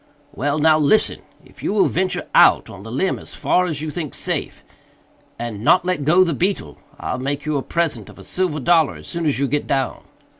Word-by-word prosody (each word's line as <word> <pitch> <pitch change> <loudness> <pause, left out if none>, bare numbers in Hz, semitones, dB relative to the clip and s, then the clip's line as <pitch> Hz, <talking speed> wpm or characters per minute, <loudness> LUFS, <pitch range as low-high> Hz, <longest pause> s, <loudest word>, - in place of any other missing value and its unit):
"Well! 145 +6 -1
now 155 0 +4
listen!—if 155 +9 -1
you - - -1
will 210 - +4
venture 185 +1 -1
out - - +5
on - - -11
the 110 +2 -9
limb 165 +10 0
as - - -11
far 180 0 +1
as 155 -3 -3
you 155 - -3
think 155 -3 -5
safe, - - -3 0.7
and 115 -3 -5
not 180 +7 +4
let 180 -6 -1
go 175 +5 +5
the 170 -3 0
beetle, 170 - -2 0.2
I'll 125 - -3
make 140 +3 -3
you 155 -1 -1
a - - -1
present 170 +2 -2
of - - -14
a - - -12
silver 180 -5 -1
dollar 160 +2 +3
as - - -12
soon 170 -2 -2
as 140 - +1
you 140 +1 +1
get 145 +2 -1
down." 135 -2 -1
155 Hz, 215 wpm, -20 LUFS, 140-175 Hz, 0.7 s, out